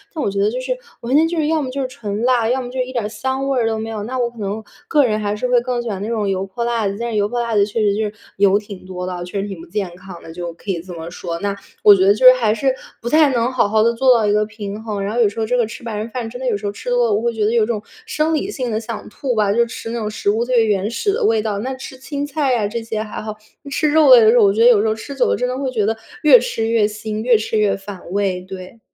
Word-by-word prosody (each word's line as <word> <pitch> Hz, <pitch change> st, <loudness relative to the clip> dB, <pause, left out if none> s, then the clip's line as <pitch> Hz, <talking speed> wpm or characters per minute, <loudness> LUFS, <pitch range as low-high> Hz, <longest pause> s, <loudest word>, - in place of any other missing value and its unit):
但 305 Hz, -, -2 dB
我 200 Hz, -, 0 dB
觉 200 Hz, -, -2 dB
得 205 Hz, -, +3 dB
就 250 Hz, -, -3 dB
是 -, -, -2 dB, 0.3 s
完 240 Hz, +3 st, -1 dB
全 315 Hz, +2 st, +5 dB
就 340 Hz, 0 st, -3 dB
是 305 Hz, -, +1 dB
要 315 Hz, 0 st, +1 dB
么 265 Hz, -, -3 dB
就 275 Hz, +2 st, -3 dB
是 260 Hz, -, -1 dB
纯 220 Hz, -5 st, -5 dB
辣， 245 Hz, -2 st, +3 dB
要 260 Hz, +1 st, +1 dB
么 245 Hz, -, -6 dB
就 260 Hz, +1 st, -5 dB
是 255 Hz, -, +1 dB
一 255 Hz, -, -8 dB
点 240 Hz, -, -1 dB
儿 -, -, -2 dB
香 265 Hz, +5 st, -3 dB
味 270 Hz, -2 st, +1 dB
儿 230 Hz, -, +1 dB
都 220 Hz, -1 st, -1 dB
没 220 Hz, +1 st, -4 dB
有， 220 Hz, -2 st, -4 dB
那 255 Hz, +4 st, -4 dB
我 240 Hz, -1 st, 0 dB
可 235 Hz, -, -20 dB
能 205 Hz, +2 st, -3 dB, 0.2 s
个 295 Hz, -3 st, +4 dB
人 215 Hz, -2 st, 0 dB
还 205 Hz, -1 st, -1 dB
是 230 Hz, +4 st, -2 dB
会 250 Hz, -1 st, +4 dB
更 245 Hz, 0 st, -2 dB
喜 235 Hz, -, -4 dB
欢 195 Hz, -3 st, -4 dB
那 205 Hz, -, -3 dB
种 220 Hz, -3 st, -1 dB
油 190 Hz, 0 st, -1 dB
泼 195 Hz, +5 st, -4 dB
辣 230 Hz, -3 st, 0 dB
子， 195 Hz, -, -3 dB
但 235 Hz, -, -2 dB
是 -, -, -3 dB
油 205 Hz, 0 st, +2 dB
泼 240 Hz, +1 st, -2 dB
辣 235 Hz, -1 st, -2 dB
子 200 Hz, -, +4 dB
确 210 Hz, +2 st, -3 dB
实 205 Hz, -1 st, +3 dB
就 220 Hz, -, 0 dB
是 210 Hz, -1 st, -3 dB, 0.2 s
油 200 Hz, 0 st, +4 dB
挺 200 Hz, -3 st, -11 dB
多 180 Hz, -1 st, -5 dB
的 185 Hz, -, -4 dB
啊， 175 Hz, -1 st, -5 dB
确 185 Hz, +3 st, -4 dB
实 200 Hz, -, -4 dB
挺 195 Hz, -4 st, -7 dB
不 -, -, -12 dB
健 190 Hz, -1 st, -3 dB
康 180 Hz, -1 st, -11 dB
的， 165 Hz, -, -10 dB
就 175 Hz, 0 st, -5 dB
可 195 Hz, +4 st, -5 dB
以 170 Hz, -3 st, -3 dB
这 180 Hz, 0 st, -10 dB
么 165 Hz, 0 st, -7 dB
说。 170 Hz, -1 st, -5 dB
那 200 Hz, +1 st, -2 dB, 0.3 s
我 205 Hz, -1 st, +9 dB
觉 190 Hz, 0 st, +2 dB
得 200 Hz, -, +6 dB
就 220 Hz, +5 st, 0 dB
是 255 Hz, -, +11 dB
还 230 Hz, -4 st, +1 dB
是 260 Hz, +4 st, +1 dB, 0.3 s
不 235 Hz, -, -6 dB
太 305 Hz, +1 st, +5 dB
能 240 Hz, +1 st, +1 dB
好 255 Hz, -5 st, +2 dB
好 215 Hz, +1 st, +3 dB
地 235 Hz, +1 st, +3 dB
做 255 Hz, +2 st, +4 dB
到 220 Hz, -, +1 dB
一 205 Hz, -, +2 dB
个 210 Hz, 0 st, +2 dB
平 210 Hz, 0 st, -7 dB
衡， 210 Hz, -3 st, -3 dB
然 200 Hz, +2 st, -3 dB
后 240 Hz, -, -1 dB
有 225 Hz, -, +5 dB
时 205 Hz, -, -8 dB
候 220 Hz, -, 0 dB
这 250 Hz, +3 st, 0 dB
个 240 Hz, -, +2 dB
吃 230 Hz, -, -10 dB
白 230 Hz, -2 st, -4 dB
人 215 Hz, +2 st, -4 dB
饭 235 Hz, -1 st, -4 dB
真 245 Hz, +2 st, -8 dB
的 260 Hz, -, -2 dB
有 230 Hz, -, +1 dB
时 205 Hz, -, -9 dB
候 200 Hz, -, -1 dB
吃 205 Hz, -, -7 dB
多 245 Hz, -1 st, +3 dB
了， 215 Hz, -, +1 dB
我 205 Hz, -, +1 dB
会 235 Hz, 0 st, 0 dB
觉 220 Hz, -2 st, 0 dB
得 215 Hz, -, +2 dB
有 230 Hz, -2 st, +3 dB
种 215 Hz, -2 st, -2 dB, 0.2 s
生 320 Hz, -8 st, 0 dB
理 320 Hz, +6 st, -1 dB
性 255 Hz, -, -3 dB
的 215 Hz, -, 0 dB
想 225 Hz, -1 st, -7 dB
吐 250 Hz, +3 st, -3 dB
吧， 210 Hz, -2 st, +2 dB
就 235 Hz, +2 st, +3 dB
吃 230 Hz, 0 st, -7 dB
那 235 Hz, -, -3 dB
种 215 Hz, -, -2 dB
食 210 Hz, -1 st, -2 dB
物 220 Hz, +3 st, +1 dB
最 240 Hz, -2 st, +3 dB
原 205 Hz, -1 st, 0 dB
始 320 Hz, -, 0 dB
的 465 Hz, +2 st, -1 dB
味 225 Hz, -, +3 dB
道， 210 Hz, -2 st, -2 dB
那 260 Hz, +5 st, -3 dB
吃 260 Hz, 0 st, -9 dB
青 285 Hz, +2 st, -4 dB
菜 290 Hz, -1 st, 0 dB
呀， 220 Hz, -4 st, +1 dB
这 230 Hz, +2 st, -4 dB
些 220 Hz, -1 st, -3 dB
还 215 Hz, -, -7 dB
好， 215 Hz, 0 st, -6 dB, 0.3 s
那 280 Hz, -, -10 dB
吃 305 Hz, +2 st, +1 dB
肉 305 Hz, -1 st, +5 dB
类 245 Hz, -, +10 dB
的 220 Hz, -, +6 dB
时 245 Hz, -, +4 dB
候， 225 Hz, -, +6 dB
我 200 Hz, -, +5 dB
觉 220 Hz, -, 0 dB
得 240 Hz, -, +8 dB
有 220 Hz, -4 st, +5 dB
时 220 Hz, -, +1 dB
候 215 Hz, -, +2 dB
吃 280 Hz, +5 st, -8 dB
久 265 Hz, -, +2 dB
了， -, -, +2 dB
真 250 Hz, -, -1 dB
的 255 Hz, +1 st, -3 dB
会 270 Hz, -1 st, -2 dB
觉 220 Hz, -5 st, 0 dB
得 225 Hz, +2 st, 0 dB, 0.3 s
越 310 Hz, +11 st, +8 dB
吃 225 Hz, -, -2 dB
越 225 Hz, -2 st, +3 dB
腥， 215 Hz, 0 st, -5 dB
越 240 Hz, -2 st, +5 dB
吃 220 Hz, +1 st, -2 dB
越 210 Hz, -2 st, +2 dB
反 195 Hz, -1 st, -9 dB
胃， 195 Hz, -2 st, 0 dB
对。 185 Hz, +3 st, -10 dB
225 Hz, 370 characters per minute, -19 LUFS, 205-250 Hz, 0.3 s, 是